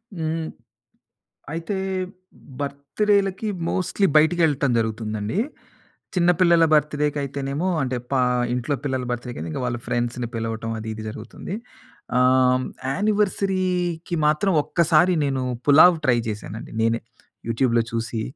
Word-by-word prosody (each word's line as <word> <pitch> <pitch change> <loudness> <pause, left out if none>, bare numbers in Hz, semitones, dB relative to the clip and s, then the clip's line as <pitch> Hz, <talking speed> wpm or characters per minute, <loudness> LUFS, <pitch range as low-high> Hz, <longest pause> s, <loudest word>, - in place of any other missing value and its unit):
హ్మ్. 160 0 -2 1.1
అయితే 170 +5 -3 0.8
బర్త్‌డే‌లకి 195 +9 0 0.2
మోస్ట్‌లీ 190 +1 +1
బయటికెళ్ళటం 155 -3 +3
జరుగుతుందండి. 110 - -2 0.8
చిన్న 180 -1 +4
పిల్లల 170 -2 +6
బర్త్‌డే‌‌కైతేనేమో 145 +1 0
అంటే 130 -1 -1 0.2
పా 135 - +3 0.3
ఇంట్లో 125 +3 -1
పిల్లల 130 -2 -1
బర్త్‌డేకైతే 120 -8 -4
ఇంకా 125 - -3
వాళ్ళ 120 -1 -2
ఫ్రెండ్స్‌ని 120 0 -2
పిలవటం 115 0 -3
అది 110 0 -6
ఇది 110 - -7
జరుగుతుంది. 115 - -7 0.6
ఆహ్, 130 0 +4 0.3
యానివర్సరీకి 185 -3 0
మాత్రం 155 +6 +2
ఒక్కసారి 170 +3 +3
నేను 135 -2 -1 0.3
పులావ్ 160 +5 +8
ట్రై 120 -2 +4
చేశానండి 105 0 -6
నేనే. 115 +1 +1 0.5
యూట్యూబ్‌లో 115 0 +2
చూసి 115 -1 -2
140 Hz, 105 wpm, -23 LUFS, 120-175 Hz, 1.1 s, పులావ్